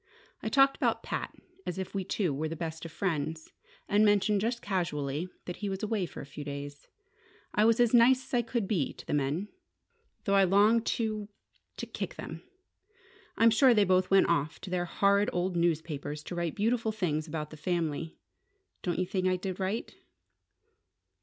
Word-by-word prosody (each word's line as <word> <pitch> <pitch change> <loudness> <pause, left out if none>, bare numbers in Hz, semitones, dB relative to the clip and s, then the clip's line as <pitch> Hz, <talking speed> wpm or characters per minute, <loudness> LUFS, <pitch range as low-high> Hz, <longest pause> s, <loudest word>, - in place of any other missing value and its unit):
I 220 - -2
talked 270 +3 +5
about - - 0
Pat - - -3 0.3
as 180 - -4
if 190 -1 -5
we 195 -1 -1
two 180 -4 -1
were 155 +3 -2
the 165 - -4
best 160 0 -5
of 165 - -7
friends, 160 -3 -2 0.4
and 205 +1 +4
mentioned 205 -1 +3
just 235 +2 -1
casually 170 -5 -2 0.2
that 180 - -5
he 205 - -3
was 190 +1 -4
away 210 -4 0
for - - -9
a - - -8
few 145 +1 -8
days. 145 0 -7 0.7
I 210 - +4
was 230 +1 +4
as 240 -1 +4
nice 250 +2 +6
as - - -17
I 245 - +4
could 235 -3 -2
be 175 -10 0
to - - -12
the - - -3
men, 145 +8 0 0.7
though 200 - 0
I 195 0 +6
longed 205 +5 +4
to 215 -2 -2 0.5
to - - -4
kick - - -5
them! - - -7 1.0
I'm 230 0 +6
sure 245 +2 +5
they 210 - +5
both 185 0 +3
went 195 0 +5
off 155 -2 0
to 190 - -7
their 180 -1 0
horrid 200 +4 +2
old 180 -1 -1
newspapers 155 -3 -1
to 180 - -7
write 170 -2 -2
beautiful 225 +1 +1
things 170 -7 -1
about 150 -1 -4
the - - -8
family. 165 -1 -2 0.6
Don't 175 -2 -2
you 185 - +1
think 185 0 -1
I 185 - +3
did 185 +1 -4
right?" 195 +4 -2
185 Hz, 190 wpm, -30 LUFS, 160-210 Hz, 1.0 s, nice